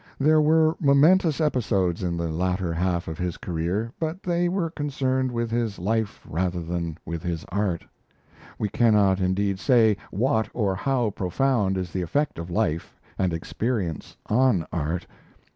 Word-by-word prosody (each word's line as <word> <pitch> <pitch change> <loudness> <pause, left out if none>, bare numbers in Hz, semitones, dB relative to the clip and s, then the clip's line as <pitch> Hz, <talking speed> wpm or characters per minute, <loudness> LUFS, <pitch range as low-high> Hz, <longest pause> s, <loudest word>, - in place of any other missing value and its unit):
There 155 +2 +4
were 160 +1 +4
momentous 155 +3 +4
episodes 100 - +1
in 85 -2 -1
the 85 -1 -2
latter 90 +1 -1
half 85 0 -1
of 80 0 -6
his 90 -2 -2
career; 90 +7 -2
but 165 +3 -3
they 175 0 +1
were 175 -3 -1
concerned 130 -4 -1
with 115 -1 -2
his 115 -3 -1
life 110 +3 -2
rather 90 +2 -1
than 85 -1 -3
with 85 0 -4
his 85 -2 -3
art. 95 -3 -1 0.7
We 105 - -1
cannot, 105 -3 +3
indeed, 95 +1 0
say 115 -5 +4
what 110 +1 +1
or 105 -5 +1
how 120 +2 0
profound 100 +1 0
is 90 -2 -3
the 95 - -2
effect 140 - -1
of 85 +1 -6
life 85 -4 -2 0.2
and 95 -2 +2
experience 90 - -3
on 110 -7 +2
art. 85 +2 -2
100 Hz, 155 wpm, -25 LUFS, 90-130 Hz, 0.7 s, There